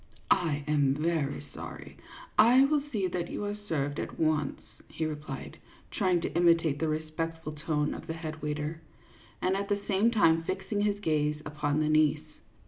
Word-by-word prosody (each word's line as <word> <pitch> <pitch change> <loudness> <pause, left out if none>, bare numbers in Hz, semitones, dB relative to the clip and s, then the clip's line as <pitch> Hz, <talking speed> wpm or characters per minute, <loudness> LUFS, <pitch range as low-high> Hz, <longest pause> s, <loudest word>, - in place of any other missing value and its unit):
" - - -9 0.2
I 145 -2 -1
am 145 -2 +2
very 150 -2 -1
sorry; - - -8 0.4
I 245 +5 +7
will 295 +1 +2
see 205 -6 0
that 175 -1 -2
you 205 - -3
are 205 - -2
served 155 -9 -3
at - - -5
once," 155 -3 +1 0.3
he 160 - -3
replied, 150 -3 -6 0.3
trying 185 -3 +2
to - - -3
imitate 165 -4 +3
the 160 - 0
respectful 155 +1 -3
tone 150 -1 -1
of - - -8
the 160 - -2
head 155 -1 -6
waiter, 150 +2 -3 0.6
and 185 +1 +2
at 200 +1 -2
the 205 0 +1
same 205 +3 +3
time 165 -8 +4
fixing 190 +4 -2
his 205 -1 +1
gaze 150 -3 +1
upon 150 0 -1
the 155 - +1
niece. 155 0 +3
160 Hz, 175 wpm, -29 LUFS, 150-185 Hz, 0.6 s, I